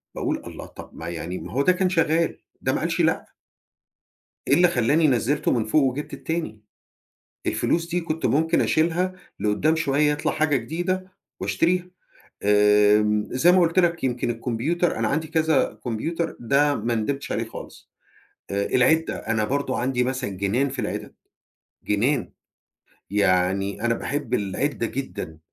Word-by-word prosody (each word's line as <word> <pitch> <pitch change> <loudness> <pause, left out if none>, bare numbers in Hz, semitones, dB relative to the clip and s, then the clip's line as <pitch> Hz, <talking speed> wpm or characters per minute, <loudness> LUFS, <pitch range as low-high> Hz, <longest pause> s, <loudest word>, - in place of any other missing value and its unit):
باقول: - - -2
"الله، - - -8
طب - - -12
ما 80 - -8
يعني 85 +2 -5
ما - - -8
هو 135 - +1
ده 160 - +4
كان 185 0 +1
شغال، 165 -2 +1 0.2
ده - - 0
ما - - 0
قالش - - 0
لأ." - - +1 1.2
إيه 140 - +5
اللي 175 +3 +5
خلّاني 150 +3 +3
نزِّلته 130 +3 +1
من 115 -3 +1
فوق 125 +8 +3
وجِبت 135 +2 -2
التاني؟ 160 -11 -4 0.8
الفلوس 170 0 0
دي 175 +1 0
كنت 160 -1 -3
ممكن 160 +3 +2
أشيلها، 170 +3 +1 0.3
لقدّام 110 +10 +2
شوية 150 -2 +2
يطلَع 150 +1 -1
حاجة 155 -2 +1
جديدة 175 +9 -3 0.3
وأشتريها. 180 +2 0 0.5
آمم، 105 +1 +4
زي 170 +8 +4
ما 185 - +5
قُلت 170 +1 +2
لك 170 -3 +2
يمكن 125 -2 0
الكمبيوتر 125 +9 -1
أنا 110 -1 +1
عندي 155 +5 -1
كذا 160 -8 +1
كمبيوتر، 165 +9 -2
ده 140 +4 +2
ما 115 +2 -1
ندمتش 135 +6 -2
عليه - - -1
خالص. - - -11 0.6
آآ، 100 0 -1
العِدّة 160 +6 +2
أنا 110 -1 -1
برضه 135 +2 -1
عندي 125 0 +1
مثلًا 130 -1 -2
جنان 100 +8 0
في 135 0 -6
العِدَد، 105 -1 -4 0.7
جنان. 120 +5 0 0.8
يعني 100 0 +1
أنا 115 0 +2
باحب 130 -1 -3
العِدّة 115 +5 -1
جدًا، 100 - -6
135 Hz, 150 wpm, -24 LUFS, 110-160 Hz, 1.2 s, إيه